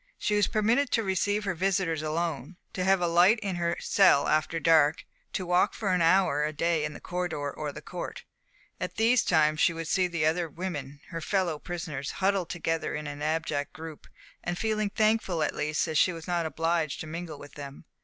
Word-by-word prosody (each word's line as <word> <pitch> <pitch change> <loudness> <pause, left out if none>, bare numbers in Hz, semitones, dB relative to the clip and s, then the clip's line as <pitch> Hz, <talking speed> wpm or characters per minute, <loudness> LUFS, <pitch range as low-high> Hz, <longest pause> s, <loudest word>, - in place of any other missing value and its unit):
She 210 - -1
was 205 -2 +3
permitted 230 +6 +2
to 225 - +2
receive 205 +2 0
her 195 -2 -1
visitors 180 -3 0
alone, 160 0 -3 0.2
to 185 - -2
have 190 0 +3
a 175 - +2
light 175 +6 +5
in 190 -3 -2
her 170 0 -1
cell 190 -8 +4
after 155 +2 +1
dark, 160 -2 +4 0.3
to 185 - -2
walk 180 +1 +2
for 195 -4 -1
an 180 - +2
hour 165 -3 +3
a 150 - 0
day 165 0 0
in 155 0 -3
the - - -9
corridor 175 -5 -3
or 150 -1 -4
the - - -10
court. 180 - -6 0.6
At - - -4
these 235 +3 +3
times 155 -2 +3
she 170 - +4
would 165 -1 -5
see 185 +2 +2
those 170 -3 -1
other 165 +1 +1
women, 145 -5 -6
her 165 -2 -5
fellow 175 -3 0
prisoners, 160 -6 -5
huddled 190 -3 0
together 165 -1 -2
in 150 0 -5
an 145 0 -6
abject 155 -2 -1
group, 160 -1 -9 0.4
and 175 0 -2
feel 215 0 0
thankful 215 -3 +1
that 155 -2 +1
at - - -15
least 150 +2 0
she 185 - +4
was 165 -2 -8
not 170 -2 0
obliged 165 -2 -1
to - - -5
mingle 165 -1 -6
with 145 0 -12
them. 140 +1 -9
170 Hz, 205 wpm, -28 LUFS, 155-185 Hz, 0.6 s, light